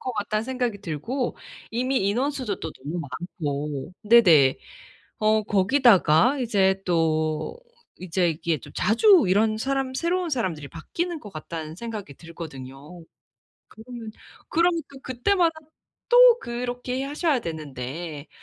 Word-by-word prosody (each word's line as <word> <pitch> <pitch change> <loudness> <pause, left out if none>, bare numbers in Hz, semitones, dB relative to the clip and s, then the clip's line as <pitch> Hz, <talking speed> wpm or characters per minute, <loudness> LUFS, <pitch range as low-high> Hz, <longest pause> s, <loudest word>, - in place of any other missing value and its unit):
것 255 - -4
같다는 215 0 -1
생각이 245 -4 -2
들고 220 - -3 0.3
이미 255 +4 -1
인원수도 250 -1 -1
또 - - -6
너무 150 +6 -6
많고 150 -1 -5
네네. 175 - +6 0.6
어 215 0 +3
거기다가 205 - +4
이제 195 -6 +2
또 160 - 0 0.4
이제 180 -1 0
이게 160 0 -1
좀 - - -14
자주 320 - +5
이런 215 +3 +2
사람 270 +2 -1
새로운 340 +5 -1
사람들이 175 - -2
바뀌는 335 - -4
것 205 - -10
같다는 160 0 -7
생각이 215 -8 -7
들거든요. 155 0 -10 0.6
그러면, 225 -1 -10 0.4
그러면 335 0 +2
또 275 -1 -13
그때마다 325 +7 +1 0.5
또 - - +7
그렇게 245 - -4
하셔야 290 -1 0
되는데 155 - -6
215 Hz, 270 characters per minute, -24 LUFS, 160-260 Hz, 0.6 s, 또